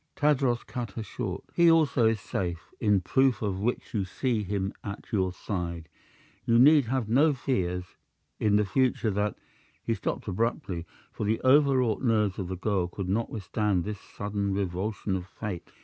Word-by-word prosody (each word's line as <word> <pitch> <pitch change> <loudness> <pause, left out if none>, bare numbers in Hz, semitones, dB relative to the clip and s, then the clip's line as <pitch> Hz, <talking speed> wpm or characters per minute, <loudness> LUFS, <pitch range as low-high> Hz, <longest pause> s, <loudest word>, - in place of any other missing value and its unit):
Tadros 135 -5 +2
cut 120 -6 -5
her 115 - -4
short. 110 - -5
"He 170 -1 +5
also 155 -8 +4
is 110 -1 +1
safe, 85 -4 -4
in 105 -4 +3
proof 130 +6 +2
of 95 -3 -1
which 120 +5 -2
you 105 -4 +1
see 115 +4 -1
him 100 -1 -2
at 100 0 -7
your 95 -3 +1
side. 85 -4 -4 0.5
You 115 - +3
need 145 +2 +7
have 125 -1 -1
no 145 +7 +4
fears 90 -9 -2 0.4
in 105 -1 +3
the 105 0 +3
future 120 +1 +1
that 105 +1 -1 0.2
" - - -35
He 115 - +1
stopped 110 - -3
abruptly, 95 - -2 0.2
for - - -5
the 110 +2 +1
overwrought 130 -4 +4
nerves 105 -5 +1
of 95 - -3
the 95 0 -4
girl 95 -2 0
could 90 +1 -5
not 110 +4 0
withstand 105 -2 -1
this 105 0 -5
sudden 100 -1 -3
revulsion 100 +1 -2
of 90 -1 -4
fate. 100 -3 -6
105 Hz, 175 wpm, -28 LUFS, 95-120 Hz, 0.5 s, need